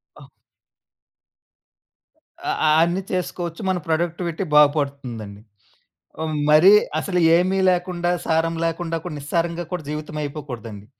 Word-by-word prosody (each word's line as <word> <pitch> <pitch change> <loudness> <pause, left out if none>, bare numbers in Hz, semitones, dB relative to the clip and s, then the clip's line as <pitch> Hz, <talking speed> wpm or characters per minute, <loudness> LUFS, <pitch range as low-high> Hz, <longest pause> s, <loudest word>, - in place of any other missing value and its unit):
ఆ! - - -15 2.2
అ 370 - -1 0.2
అ 155 - +4
అన్ని 175 +3 0
చేసుకోవచ్చు. 175 -1 -3
మన 185 - +1
ప్రొడక్టివిటీ 170 +2 -1
బాగుపడుతుందండి. 140 -8 +1 0.8
ఆహ్, 155 -1 -2 0.2
మరీ 175 +7 +7 0.3
అసలు 180 +1 -1 0.2
ఏమి 185 +2 +1
లేకుండా, 175 -1 0
సారం 165 0 +1
లేకుండా 165 0 -2
కూడా, 175 -4 -6
నిస్సారంగా 170 +4 -2
కూడా 180 -3 -4
జీవితమైపోకూడదండి. 145 -8 -6
165 Hz, 105 wpm, -22 LUFS, 150-175 Hz, 2.2 s, మరీ